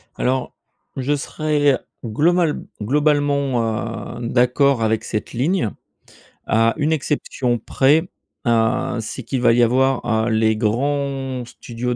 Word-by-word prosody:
Alors, 130 0 -1 0.4
je 135 +3 0
serais 145 -1 +1 0.3
global 160 +8 +1 0.2
globalement, 135 -5 0
heu, 120 - -4
d'accord 125 0 +3
avec 110 0 +1
cette 110 - -4
ligne. 135 - 0 0.7
À 115 +1 +2
une 155 +1 +1
exception 135 -4 -1
près, 150 - +2 0.4
heu, 120 +2 +1
c'est 115 +3 -6
qu'il 125 +2 -3
va 115 -1 +5
y 120 +1 +4
avoir, 130 +2 +2 0.2
heu, - - +1
les 110 0 +2
grands 135 +3 -1
studios 120 +1 -5
130 Hz, 120 wpm, -20 LUFS, 115-145 Hz, 0.7 s, va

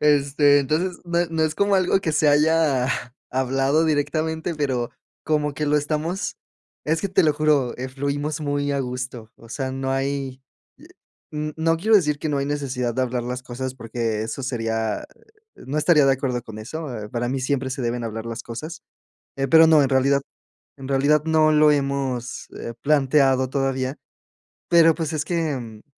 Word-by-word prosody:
este, 145 -1 +4
entonces, 165 +6 -1
no 170 0 -1
no 160 -1 0
es 155 0 0
como 200 0 +2
algo 190 0 +3
que 160 -5 -1
se 150 0 +3
haya 150 -3 +3 0.4
hablado 135 +4 +1
directamente, 160 +2 -1
pero 130 -5 -1 0.3
como 150 -2 0
que 150 +2 -3
lo 150 - +3
estamos 155 +5 -2 0.5
es 160 +1 0
que 200 - -2
te 180 - +3
lo 150 - +4
juro, 150 -4 +1
eh, 130 +1 -5
fluimos 145 +3 -3
muy 145 -1 -1
a 140 - 0
gusto, 125 -3 -5
o 115 - -16
sea, 130 +2 -3
no 135 0 -3
hay, 135 -1 -2 0.4
i - - -16 0.5
n 150 0 -3
no 165 +1 +2
quiero 215 +6 +4
decir 150 -6 +1
que 155 - -2
no 145 - 0
hay 140 - -1
necesidad 130 -5 -2
de 130 - +1
hablar 125 -1 -2
las 125 +1 -4
cosas 130 +1 -5
porque 115 -2 -3
eso 115 +4 -5
sería 115 - -2 0.5
no 140 +3 -6
estaría 150 -2 +4
de 135 - +5
acuerdo 130 -2 -1
con 110 -2 -10
eso, 155 +8 -6 0.2
eh, - - -8
para 120 +1 -2
mí 135 +1 -2
siempre 130 0 -1
se 130 - -4
deben 120 0 -2
hablar 110 0 -5
las 115 0 -6
cosas, 155 +8 -7 0.5
eh, 135 -1 -1
pero 160 +2 +7
no, 155 -2 +6
en 135 - +2
realidad 140 +1 +3 0.6
en 135 -1 -9
realidad 145 +2 +3
no 155 -1 +4
lo 150 0 +5
hemos, 135 -4 -2
eh, 115 - -5
planteado 135 -3 +3
todavía, 135 0 -1 0.7
pero 165 -2 +6
pues 160 -2 -3
es 150 -1 -2
que, 170 +1 -1
em 115 -5 -7
140 Hz, 185 wpm, -23 LUFS, 130-155 Hz, 0.7 s, pero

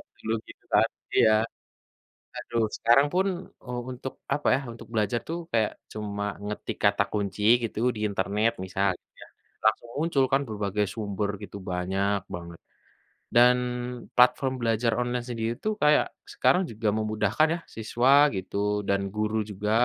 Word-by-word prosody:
Ingat - - -13 0.2
dulu 110 - -3 0.2
gitu - - -14
tadi - - +1
ya, 110 - +6 1.1
aduh 115 -1 -1
sekarang 120 +5 +5
pun, 190 +1 +3 0.4
eee, 125 -1 -5
u - - -7
untuk 130 +1 -6 0.2
apa 145 - -3
ya 135 - 0
untuk 115 - -11
belajar 110 +2 +1
tuh 170 - -2
kayak 110 -2 +2 0.2
cuma 105 -1 -4 0.2
ngetik 105 0 -4
kata 100 0 +4
kunci 105 0 -2 0.2
gitu 110 -1 -3 0.2
di - - -6
internet 100 +3 +1
misal 95 +1 +1
gitu - - -64
ya - - -15 0.4
langsung 120 - +2
muncul 150 -3 +2
kan 135 +1 +4
berbagai 105 -1 -1
sumber 105 -1 -2
gitu 100 +1 -8
banyak 95 +3 0 0.2
banget, 85 -1 -9 0.8
dan 125 +1 +7 0.6
platform 125 +2 +4
belajar 115 0 +1
online 120 0 -1
sendiri 115 -1 -2
tuh 215 0 +1
kayak 150 0 +5 0.3
sekarang 180 - +3
juga 110 0 -2
memudahkan 110 +6 +1
ya? - - -9
Siswa 130 +6 +4
gitu 95 +1 -5 0.3
dan 100 0 +2
guru 110 +1 0
juga, 105 +1 -3
110 Hz, 155 wpm, -27 LUFS, 100-125 Hz, 1.1 s, dan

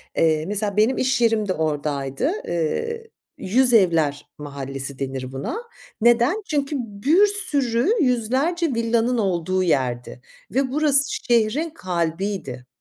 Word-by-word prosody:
Eee, 155 -1 +2
mesela 205 +1 -2
benim 225 +5 +3
iş 260 -1 +1
yerim 225 -3 +2
de 185 - 0
oradaydı. 150 - -2 0.2
Eee, 455 - -2 0.3
"Yüzevler 190 - +2
mahallesi." 140 -2 -6
denir 130 -1 -4
buna. 135 - -4 0.4
Neden? 240 - +3
Çünkü 290 -1 -1
bir 250 - +2
sürü 290 - +1
100'lerce 265 +8 +1
villanın 230 +1 +1
olduğu 185 -2 0
yerdi 125 -6 -1 0.3
ve 265 0 0
burası 285 -1 +3
şehrin 240 +7 +1
kalbiydi. 170 - -3
215 Hz, 110 wpm, -22 LUFS, -, 0.4 s, benim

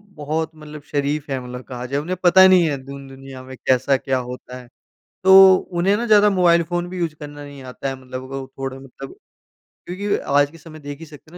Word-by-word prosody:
बहुत 155 +2 -3
मतलब 150 -1 -11
शरीफ़ 145 0 -2
हैं 135 - -1
मतलब 125 0 -8
कहा 125 -1 -7
जाए, 140 +3 -2
उन्हें 180 +4 -4
पता 190 +2 +7
नहीं 185 -2 +5
है 140 - -2
दुन 140 0 -10
दुनिया 135 -1 -11
में 130 0 -10
कैसा 130 +1 +3
क्या 130 0 -2
होता 125 0 -8
है। 125 -1 -13 0.6
तो 190 0 +9 0.3
उन्हें 195 +3 +2
ना 235 +3 -3
ज़्यादा 210 -2 +5
मोबाइल 175 -3 +3
फ़ोन 175 +1 -3
भी 185 +1 -7
यूज़ 165 -3 -2
करना 145 -1 -10
नहीं 140 -2 -11
आता 130 +1 -6
है 135 - -3
मतलब 130 0 -7
वो 135 -1 -5
थोड़ा 135 0 -5
मतलब 135 0 -11 0.7
क्योंकि 200 +3 -2 0.2
आज 145 0 +3
के 165 - -15
समय 155 0 -13
देख 145 0 -9
ही 165 - -9
सकते 155 0 -16
हैं 175 - -12
145 Hz, 220 wpm, -20 LUFS, 135-175 Hz, 0.7 s, तो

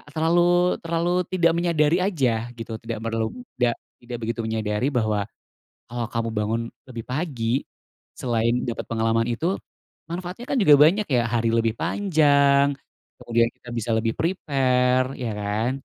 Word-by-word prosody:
Terlalu 165 +3 +2 0.4
terlalu 170 +1 -1 0.2
tidak 170 -3 +3
menyadari 170 -1 +2
aja 130 - 0
gitu, 115 -1 -6
tidak 115 -2 -5
perlu, 115 -1 -1 0.3
da 120 -1 +2 0.2
tidak 120 0 -6
begitu 115 +1 -3
menyadari 110 +2 -1
bahwa, 110 -5 0 0.6
kalau 120 -1 -4
kamu 115 -1 -2
bangun 110 +1 -1 0.3
lebih 115 -3 -7
pagi 130 -4 -1 0.6
selain 120 0 0
dapet 120 - -4
pengalaman 115 0 +1
itu, 160 +10 0 0.6
manfaatnya 180 +7 -6
kan 275 - 0
juga 150 -7 +7
banyak 195 +8 +5
ya, 125 -2 +3
hari 115 -1 +1
lebih 115 -1 +1
panjang, 145 -6 +3 0.5
kemudian 115 0 +2
kita 125 - -17
bisa 115 0 -3
lebih 115 0 0
prepare, 130 -6 +1
iya 120 -4 -3
kan. 105 +4 -1
125 Hz, 140 wpm, -24 LUFS, 115-155 Hz, 0.6 s, juga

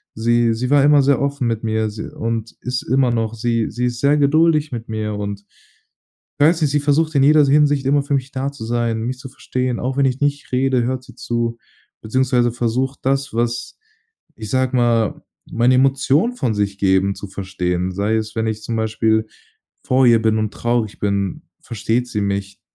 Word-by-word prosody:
Sie 115 +1 +2
sie 125 +3 -3
war 145 -1 +4
immer 145 0 +5
sehr 140 0 +2
offen 140 -3 -1
mit 115 -1 -2
mir 110 -1 0
si 105 +1 -7
und 115 0 -4
ist 125 0 -2
immer 130 0 +2
noch. 115 -1 -1
Sie 115 0 -1
sie 125 +1 -2
ist 120 -1 -3
sehr 145 +1 +3
geduldig 155 +1 +3
mit 115 -1 -6
mir 110 -1 -3
und 100 0 -5 0.9
weiß 160 +3 +3
nicht, 150 - +2
sie 145 - +2
versucht 155 +3 +1
in 135 - +4
jeder 150 +2 +6
s 140 - +2
Hinsicht 145 -1 +3
immer 140 +1 +3
für 140 - -1
mich 135 -1 -2
da 135 +1 -3
zu 140 -5 -9
sein, 115 -1 -1
mich 125 +2 -3
zu 135 +1 -9
verstehen, 125 -1 -3
auch 130 +1 -2
wenn 140 - +2
ich 130 0 -1
nicht 145 -1 -1
rede, 130 -1 +1
hört 130 +1 -2
sie 125 - -15
zu, 115 -1 -2 0.4
beziehungsweise 120 +1 +1
versucht 125 +3 -2
das, 135 -1 -1
was, 120 0 -2 0.6
ich 110 -2 -7
sage 130 0 +1
mal, 115 -3 +1 0.3
meine 120 +2 +3
Emotionen 135 - +2
von 120 - -1
sich 100 -1 -2
geben, 95 0 +2
zu - - -7
verstehen. 95 -2 -3
Sei 100 +4 -1
es, 110 0 -4
wenn 110 0 0
ich 110 -1 -3
zum 115 +1 -3
Beispiel 110 0 +1 0.6
vor 130 0 +3
ihr 115 -2 +5
bin 110 0 +2
und 110 -1 -2
traurig 120 -3 -1
bin, 100 -2 -1 0.2
versteht 115 +2 -2
sie 105 - -3
mich 100 0 -3
120 Hz, 200 wpm, -19 LUFS, 110-135 Hz, 0.9 s, jeder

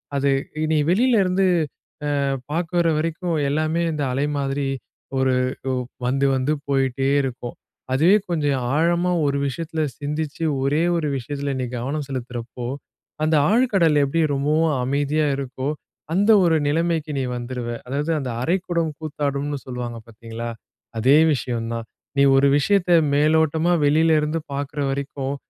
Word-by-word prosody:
அது 140 0 +2 0.4
நீ 155 - +3
வெளிலருந்து 195 -3 +3 0.8
அ - - +1 0.3
பாக்குற 170 +2 0
வரைக்கும், 165 +2 -1
எல்லாமே 155 +3 0
இந்த 150 -1 -2
அலை 135 +3 0 0.2
மாதிரி 140 0 -1 0.5
ஒரு 130 -1 +2 0.4
ஒ - - 0 0.3
வந்து, 135 +2 +1
வந்து 130 +3 0 0.2
போய்ட்டே 135 -1 +1
இருக்கும். 120 -2 -5 0.4
அதுவே 165 +9 +5
கொஞ்சம் 145 -6 0
ஆழமா 170 +3 +2
ஒரு 140 0 +1
விஷயத்துல 160 +3 -3 0.2
சிந்திச்சு, 150 +2 -3 0.2
ஒரே 145 +3 +2 0.2
ஒரு 160 -2 -1
விஷயத்துல 140 +2 -4
நீ - - -1
கவனம் 140 +5 -3
செலுத்துறப்போ, 120 -2 -5 0.6
அந்த 155 +1 +3 0.2
ஆழ்கடல் 195 -10 +3
எப்படி 140 +4 +1
ரொம்பவும் 150 +3 +1
அமைதியா 145 +3 +1
இருக்கோ, 135 0 -4 0.5
அந்த 200 +5 +4
ஒரு 165 -2 +3
நிலைமைக்கு 160 0 0
நீ - - 0
வந்துருவ. 120 0 -5 0.2
அதாவது 145 +5 -1
அந்த 135 -3 -4
"அரை 170 +9 +2
குடம் 170 -3 0
கூத்தாடும்ன்னு" 145 -2 -2
சொல்லுவாங்க 125 -2 -5
பாத்தீங்களா? 115 +1 -7 0.5
அதே 130 +6 +5 0.2
விஷயம் 120 -3 -3
தான். 115 -1 -4 0.3
நீ 140 - +5
ஒரு 135 +1 +5
விஷயத்த 180 +5 +2 0.2
மேலோட்டமா 160 +3 +3
வெளிலருந்து 155 +1 +3
பாக்குற 145 +1 -4
வரைக்கும் 140 0 -3
145 Hz, 130 wpm, -22 LUFS, 135-160 Hz, 0.8 s, அதுவே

